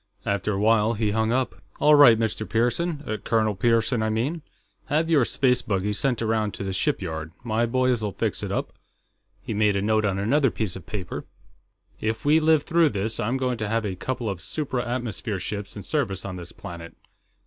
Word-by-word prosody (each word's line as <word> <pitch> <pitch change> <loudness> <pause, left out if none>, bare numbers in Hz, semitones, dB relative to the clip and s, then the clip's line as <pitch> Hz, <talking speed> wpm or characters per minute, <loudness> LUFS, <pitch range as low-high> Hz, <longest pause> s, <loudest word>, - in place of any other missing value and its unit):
After 100 +1 0
a 95 - -1
while, 110 +1 +3
he 105 -1 0
hung 110 +1 +1
up. 125 0 -1 0.2
"All 150 - +5
right, 140 -6 +8
Mr. 110 -1 -2
Pearson 120 +1 0
Colonel 110 -2 +1
Pearson, 115 +3 +2
I 110 - +1
mean. 130 +10 -1 0.4
Have 160 +3 0
your 145 -5 +5
space 125 0 +2
buggy 100 0 -1
sent 120 +3 0
around 110 -2 0
to - - -5
the 95 -1 -3
shipyard. 80 -4 -1
My 115 0 0
boys'll 125 -3 +1
fix - - -2
it - - -4
up." - - -2 0.7
He - - -4
made 105 -1 +2
a 100 - +1
note 110 +1 +2
on 100 -2 0
another 135 +8 +2
piece 110 -5 -3
of 95 -4 -10
paper. 95 -4 -5 0.7
"If 110 +3 -2
we 150 +2 +5
live 155 -1 +3
through 165 -1 +3
this, 110 0 -2
I'm 120 +5 0
going 125 -2 -1
to 110 -1 -2
have 115 0 0
a 100 - -2
couple 120 +4 -3
of 95 -4 -3
supra 130 -5 -2
atmosphere 120 -4 -3
ships 100 +2 -5
in 100 - -7
service 100 - -2
on 95 -2 -5
this 85 -1 -8
planet.... 85 0 -9
110 Hz, 195 wpm, -25 LUFS, 100-125 Hz, 0.7 s, right